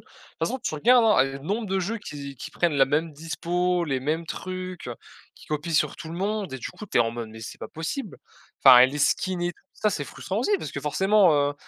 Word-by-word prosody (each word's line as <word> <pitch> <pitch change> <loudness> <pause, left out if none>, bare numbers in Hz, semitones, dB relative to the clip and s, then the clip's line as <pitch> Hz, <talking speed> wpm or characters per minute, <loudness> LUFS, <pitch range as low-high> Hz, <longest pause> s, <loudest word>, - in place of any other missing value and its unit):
toute - - -24 0.3
façon, 260 - -1
tu 235 -10 -3
regardes, 235 +9 +5
hein, 210 -11 +5
le 135 0 -5
nombre 205 +11 -3
de 195 0 0
jeux 215 +6 -2
qui 140 -7 -8
qui 165 - -8
prennent 170 -2 0
la 135 -1 +5
même 150 +3 0
dispo, 175 +3 -1
les 135 -4 -1
mêmes 160 +5 -2
trucs, 185 -7 -6 0.4
qui - - -17
copient 155 +2 -3
sur 150 - +2
tout 165 -1 -8
le 165 - -6
monde 205 -3 -2
et 130 - -4
du - - -5
coup, 215 - -10
tu 190 - 0
es - - +6
en 115 -1 +2
mode: 115 -2 -5
«Mais 110 0 -11
c'est 110 - -8
pas - - -7
possible». 170 - -5 0.5
Enfin 125 -2 +10
et 130 - +8
les 145 +3 -5
skins 185 +4 +1
et 175 0 -1
tout - - -29
ça 215 - 0
c'est 150 -8 -2
frustrant 190 +8 -6
aussi 245 - -1
parce 155 -3 -6
que 140 - -4
forcément, 190 +5 +4
heu, 145 -1 +2
165 Hz, 250 wpm, -25 LUFS, 145-190 Hz, 0.5 s, Enfin